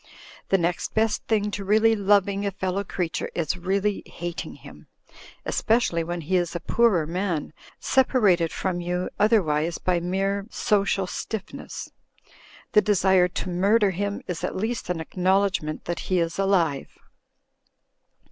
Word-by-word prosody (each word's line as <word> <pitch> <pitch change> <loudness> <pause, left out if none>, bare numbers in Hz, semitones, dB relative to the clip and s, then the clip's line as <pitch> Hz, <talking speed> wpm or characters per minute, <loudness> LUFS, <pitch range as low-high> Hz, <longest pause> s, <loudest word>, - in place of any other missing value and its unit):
The 195 - +4
next 175 0 -2
best 220 0 +1
thing 210 -2 +1
to 200 - -4
really 220 +3 +4
loving 200 -1 +2
a 200 - +1
fellow 190 0 -2
creature 180 -3 -3
is 165 -2 -1
really 195 +3 -1
hating 175 0 -6
him: - - -14 0.6
especially 220 -8 +1
when 175 +1 -4
he 185 +4 +1
is 175 -1 -1
a - - -1
poorer 195 -3 +2
man 170 -2 -2 0.3
separated 205 -11 +3
from 180 -2 -2
you 180 +1 -2
otherwise 170 -7 +2
by 180 -1 0
mere 195 +3 -1
social 200 -4 +1
stiffness. 200 +2 -6 0.8
The 210 - +6
desire 190 -3 +3
to 180 +1 -4
murder 200 +4 +3
him 200 +2 -3
is 180 -2 -5
at - - -2
least 220 +3 -3
an 180 - 0
acknowledg 185 +4 +1
ment 155 0 -6
that 170 -1 -3
he 185 - -1
is 165 +1 -1
alive. 175 -8 +1
190 Hz, 145 wpm, -25 LUFS, 175-205 Hz, 0.8 s, The